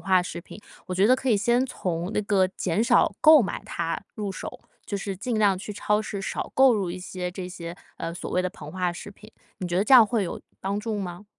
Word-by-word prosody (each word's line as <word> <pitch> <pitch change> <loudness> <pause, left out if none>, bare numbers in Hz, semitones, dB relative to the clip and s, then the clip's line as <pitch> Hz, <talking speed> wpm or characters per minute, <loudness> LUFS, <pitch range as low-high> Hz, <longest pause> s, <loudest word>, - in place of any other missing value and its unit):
化 185 +1 +3
食 175 - -6
品， 190 - -12 0.3
我 185 - -3
觉 195 +3 +4
得 255 - +6
可 265 - -3
以 220 - +4
先 240 +5 +2
从 180 -6 -3
那 - - +2
个 195 -2 +3
减 185 +1 -1
少 240 +1 +3
购 310 -4 +8
买 195 - -4
它 165 -1 -2 0.2
入 205 -2 -3
手， 190 - -7 0.2
就 200 - -3
是 195 -1 -4
尽 225 +3 -2
量 200 -3 +4
去 210 +2 -6
超 210 +1 0
市 200 -2 -5
少 - - -4
购 265 -2 +6
入 190 -4 -1
一 185 - -5
些 180 -1 -5
这 180 0 -6
些， 170 -1 -7 0.2
呃， 165 0 -4
所 175 - -6
谓 180 - +1
的 185 - -2
膨 150 -3 -10
化 180 -1 -1
食 200 +4 -9
品， 210 +2 -16 0.3
你 185 - -3
觉 175 0 -1
得 - - +3
这 265 - +6
样 235 -4 +9
会 225 -2 0
有 175 - -4 0.2
帮 200 +1 -2
助 215 -1 -3
吗？ 180 +1 -6
195 Hz, 270 characters per minute, -25 LUFS, 180-215 Hz, 0.3 s, 样